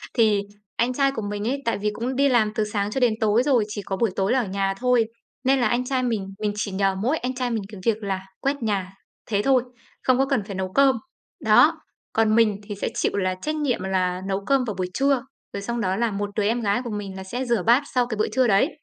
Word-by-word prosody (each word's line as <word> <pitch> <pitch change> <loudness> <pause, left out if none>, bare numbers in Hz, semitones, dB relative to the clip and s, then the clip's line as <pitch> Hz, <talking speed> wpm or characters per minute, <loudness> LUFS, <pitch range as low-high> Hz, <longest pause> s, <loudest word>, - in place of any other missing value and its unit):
Thì 215 -4 +4 0.4
anh 245 +2 +1
trai 275 +1 +2
của 245 -5 -4
mình 205 +1 -3
ấy, 275 +3 -1
tại 230 - +1
vì 210 +1 0
cũng 245 +5 -3
đi 280 +1 +3
làm 220 -4 +3
từ 215 - +1
sáng 210 -1 -2
cho 265 - -1
đến 240 -3 +3
tối 220 +3 +3
rồi, 255 -6 +3
chỉ 210 -1 -5
có 195 0 -4
buổi 230 -2 +1
tối 195 +3 +1
là 260 - +3
ở 235 - 0
nhà 195 0 0
thôi, 250 -2 +3 0.4
nên 270 0 +3
là 240 - +3
anh 245 +3 0
trai 255 -1 0
mình, 215 -6 -1
mình 210 -1 0
chỉ 205 -1 -3
nhờ 195 0 +1
mỗi 250 +11 0
anh 250 +1 -3
trai 250 -1 -1
mình 220 -3 -1
cái 195 -3 -9
việc 220 -2 +1
là 195 -1 -2 0.2
quét 275 -2 -1
nhà, 195 -3 -1 0.3
thế 205 -2 +1
thôi, 260 -1 +4 0.4
không 255 -1 +3
có 270 - +3
cần 270 -6 0
phải 195 -1 -7
nấu 190 -1 -3
cơm. 270 0 +5 0.5
Đó, - - +5 0.3
còn 220 -1 +3
mình 215 -3 +3
thì 205 0 -6
sẽ 200 - -2
chịu - - +1
là 185 -1 0
trách 305 +1 -2
nhiệm 285 -9 0
là 185 -1 0
nấu 195 +1 -2
cơm 275 -2 +3
vào 215 - -3
buổi 185 -1 -1
trưa, 275 -2 +2 0.3
rồi 200 - -4
xong 235 +3 -3
đó 190 -1 0
là 235 +1 0
một 205 0 -3
đứa 210 - +1
em 230 +4 +1
gái 210 +3 +1
của 235 - -5
mình 200 -2 -5
là 190 - -6
sẽ 245 +7 -4
rửa 235 -6 +1
bát 240 +5 +4
sau 250 -1 +4
cái 225 -3 -4
bữa 215 - +1
trưa 255 +3 +2
đấy, 210 +8 +4
220 Hz, 270 wpm, -24 LUFS, 200-250 Hz, 0.5 s, cơm